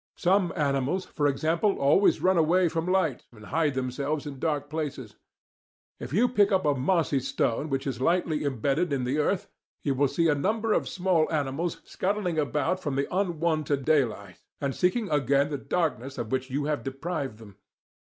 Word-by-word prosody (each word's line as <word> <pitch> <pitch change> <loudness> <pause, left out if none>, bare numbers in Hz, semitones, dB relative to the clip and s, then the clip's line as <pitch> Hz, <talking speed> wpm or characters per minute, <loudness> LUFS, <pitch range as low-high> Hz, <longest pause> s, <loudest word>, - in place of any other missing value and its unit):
Some 185 0 +2
animals, 145 +3 0
for 145 -2 0
example, 165 +8 +1
always 145 +8 +3
run 185 +1 +4
away 175 +2 +3
from 165 +2 -2
light 175 -9 0
and 110 -2 -14
hide 150 0 0
themselves 140 +4 -2
in 140 -2 -7
dark 145 -2 -1
places. 145 -7 -5 0.8
If - - -7
you 220 +10 +3
pick 210 -5 +3
up 190 -3 +2
a 145 - +4
mossy 145 +1 +1
stone 130 +2 -1
which 135 -1 -2
is 130 -3 -3
lightly 165 0 +1
embedded 140 +5 0
in 135 -2 0
the 130 +5 0
earth, 180 +5 0 0.4
you 140 - +1
will 140 +2 +2
see 165 +5 +1
a 155 - +4
number 215 +9 0
of - - 0
small 180 -4 +1
animals 155 +2 -2
scuttling 185 -4 -1
away 150 +4 0
from 145 -7 -3
the 140 +5 -2
unwonted 160 -7 0
daylight 110 - 0 0.2
and 140 -1 -1
seeking 195 +5 +1
again 140 0 +2
the 145 - -2
darkness 140 -5 -2
of 110 - -4
which 130 0 -1
you 140 +2 -2
have 150 -1 -1
deprived 135 -2 -4
them. 105 -4 -14
150 Hz, 180 wpm, -27 LUFS, 135-175 Hz, 0.8 s, run